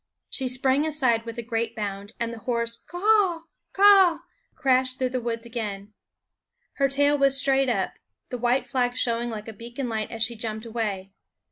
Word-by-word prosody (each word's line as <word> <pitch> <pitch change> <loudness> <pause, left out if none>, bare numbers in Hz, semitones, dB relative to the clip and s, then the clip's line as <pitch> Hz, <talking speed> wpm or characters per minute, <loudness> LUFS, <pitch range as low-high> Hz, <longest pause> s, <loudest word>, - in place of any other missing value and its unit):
She 265 - -1
sprang 265 +4 +1
aside 255 -7 +1
with 230 0 -6
a 235 - -4
great 230 0 -2
bound, 205 -1 -5
and 230 0 -2
the 230 - -8
hoarse 235 0 -2
K 350 - -11
a - - -5
a - - -9
a 415 -5 +4
h! 330 - -18 0.3
k 390 - 0
a - - +9
a - - +11
a 385 -4 +7
h! - - -15 0.4
crashed 260 -3 +1
through 255 -1 0
the 255 -1 -2
woods 230 0 -3
again. 210 -4 -5 0.8
Her 275 - +3
tail 285 +1 +2
was 275 0 +6
straight 270 -1 +3
up, 195 -6 -2 0.3
the 250 - -5
white 245 +2 +1
flag 250 -2 -1
showing 235 -1 0
like 215 -1 -6
a 225 - -7
beacon 240 +4 -6
light 220 -2 -3
as 225 -1 0
she 235 +1 +1
jumped 220 0 -5
away. 205 -4 -4
240 Hz, 220 wpm, -25 LUFS, 225-270 Hz, 0.8 s, a